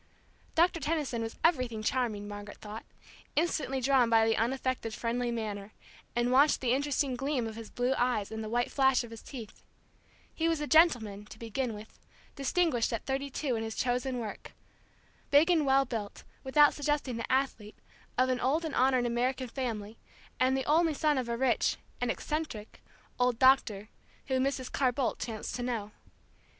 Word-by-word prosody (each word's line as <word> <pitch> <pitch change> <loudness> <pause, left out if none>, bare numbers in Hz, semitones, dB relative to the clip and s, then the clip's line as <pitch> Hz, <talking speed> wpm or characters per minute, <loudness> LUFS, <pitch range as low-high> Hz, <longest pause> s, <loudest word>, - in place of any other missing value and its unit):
Doctor 340 +1 +3
Tension 295 -6 -1
was 225 0 -5
everything 255 -9 +1
charming, 215 -4 -1
Margaret 205 0 -8
thought, 215 +1 -8 0.5
instantly 300 -4 0
drawn 260 -2 +3
by 225 -1 +5
the 225 0 +2
unaffected, 250 -1 -1
friendly 240 +1 -1
manner, 215 -3 -4 0.4
and 240 +1 +1
watching 280 +4 +5
the 245 -2 +1
interested 280 -1 0
gleam 270 -1 -1
of 220 -1 -6
his 225 -1 -8
blue 250 +2 0
eyes 240 -5 0
and 220 0 -4
the 215 - -5
white 240 +2 0
flash 265 -2 +3
of 235 - -10
his 225 - -9
teeth 235 -6 -10 0.7
He 330 0 0
was 325 -2 0
a 300 - -2
gentleman, 240 - +3
to 215 - -12
begin 230 +1 -3
with; 210 +1 -12 0.4
distinguished 280 -3 +1
at 230 - -3
thirty 275 +1 -2
two 270 -2 -2
in 225 - -2
his 225 0 -4
chosen 250 +1 -1
work; 225 -3 -6 0.8
big 300 +5 +5
and 315 -5 +2
well 270 0 +4
built, 220 -5 -5 0.2
without 295 +2 +5
suggesting 290 -4 -1
the 230 - -4
athlete, 255 -5 -1 0.4
of 255 +1 +3
an 255 -1 +1
old 295 +7 +1
and 310 - -4
honored 255 -1 +3
American 250 +2 -1
family, 225 -4 -4 0.4
and 260 +1 +3
the 265 - -2
only 320 +2 +3
son 300 -2 +2
of 245 -2 -4
a 235 - -1
rich 255 -1 +2 0.2
and - - 0
eccentric 300 -9 -4 0.4
old 250 -1 +2
doctor 245 -6 +4 0.4
whom 260 -1 +2
Mrs. 275 -2 -2
Carr 260 -3 +2
Bolt 260 0 -1
chanced 220 -3 -5
to - - -4
know. 230 -4 -3
250 Hz, 175 wpm, -30 LUFS, 225-275 Hz, 0.8 s, by